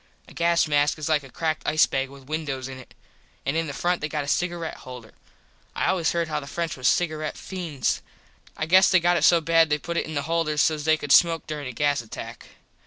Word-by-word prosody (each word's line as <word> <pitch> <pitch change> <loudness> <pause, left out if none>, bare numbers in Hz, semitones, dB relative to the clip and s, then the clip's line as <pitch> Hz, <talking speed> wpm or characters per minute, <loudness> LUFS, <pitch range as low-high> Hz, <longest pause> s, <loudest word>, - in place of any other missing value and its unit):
A - - -15
gas 170 -1 +2
mask 145 0 +2
is 155 - -4
like 155 -2 +2
a 135 - -13
cracked 155 +4 -2
ice 155 - +4
bag 135 0 -2
with 140 -1 -14
windos 145 -4 -3
in 135 -1 -8
it. 130 - -15 0.5
An 140 - -1
in 165 0 0
the - - -4
front 175 +5 -1
they 155 - -2
got 150 -1 -2
a - - -8
cigaret 175 +1 -2
holder. 125 -3 -11 0.6
I - - 0
always 170 -4 +1
heard 170 -1 -1
how 155 - -2
the 140 - -10
French 165 +2 -3
was 130 -1 -1
cigaret 155 -3 0
feends. 165 - -3 0.6
I 155 - -1
guess 185 +4 +5
it 180 - +6
got 175 +1 +2
so 170 -1 +5
bad 165 0 +3
they 150 - +2
put 170 +3 -5
in 155 -1 -2
the 140 - -1
holders 155 -1 0
sos 155 -2 +1
they 160 0 +4
could 145 -2 -5
smoke 165 0 +5
during 150 -3 -5
a - - -5
gas 145 +2 0
attack. 115 - -9
155 Hz, 235 wpm, -24 LUFS, 145-165 Hz, 0.6 s, it